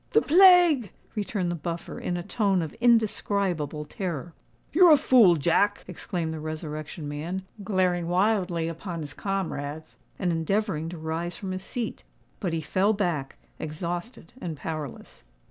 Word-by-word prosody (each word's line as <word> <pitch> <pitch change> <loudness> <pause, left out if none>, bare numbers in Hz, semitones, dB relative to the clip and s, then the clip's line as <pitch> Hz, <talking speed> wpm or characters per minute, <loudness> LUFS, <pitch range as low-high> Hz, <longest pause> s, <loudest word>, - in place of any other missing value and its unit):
"The 445 - +6
plague!" 350 - +6 0.2
returned 200 -4 -2
the - - -2
Buffer, 170 +1 -5
in 175 - -2
a 175 - -4
tone 195 -4 +1
of 155 - -6
indescribable 200 - +1
terror. 170 -1 -5 0.4
"You're 355 +2 +7
a 300 - +8
fool, 230 -11 +6
Jack!" 175 +7 +2
exclaimed 170 -2 -4
the 160 - -5
Resurrection 155 0 -5
Man, 165 +6 -4 0.2
glaring 185 -3 +1
wildly 180 -2 +1
upon 165 +1 -5
his 145 -1 -6
comrades, 160 -6 -4 0.2
and 180 -3 0
endeavouring 165 0 -1
to 175 - -7
rise 160 +2 -3
from 190 -2 -5
his 185 0 -4
seat. 230 +4 -5 0.4
But 185 -5 -2
he 165 0 -1
fell 190 +8 +2
back, 170 -9 -2 0.2
exhausted 170 +5 -5
and 165 -4 -4
powerless. 155 -3 -6
175 Hz, 145 wpm, -26 LUFS, 160-200 Hz, 0.4 s, a